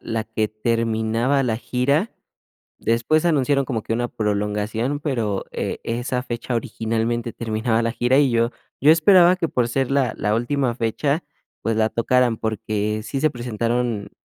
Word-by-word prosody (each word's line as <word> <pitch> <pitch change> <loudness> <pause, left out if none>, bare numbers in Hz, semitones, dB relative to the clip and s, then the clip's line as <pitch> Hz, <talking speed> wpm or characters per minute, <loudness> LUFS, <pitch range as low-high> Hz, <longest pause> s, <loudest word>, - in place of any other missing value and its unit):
la 115 -1 -2
que 110 -1 -1
terminaba 115 +4 0
la 115 -4 0
gira. 140 - 0 0.7
Después 120 +8 +1
anunciaron 140 -4 +2
como 115 -5 -3
que - - -6
una 120 +1 -1
prolongación, 105 +5 -1
pero, 115 -10 -1
eh, - - -3
esa 120 +2 -2
fecha 120 0 -4
originalmente 115 +1 -2
terminaba 110 0 -1
la 115 - 0
gira. 120 +2 +2
Y 140 -3 +4
yo 115 0 +2 0.3
yo 150 - +7
esperaba 175 +2 +6
que 175 -2 -1
por 125 -5 0
ser 135 +2 -1
la 135 -4 +2
la 105 - 0
última 120 +2 0
fecha, 140 +7 -1 0.4
pues, 115 - 0
la 110 0 +2
tocaran, 120 0 +2
porque 110 -1 -2
sí 115 +5 -3
se 155 - +4
presentaron 120 -3 -2
120 Hz, 155 wpm, -22 LUFS, 110-135 Hz, 0.7 s, yo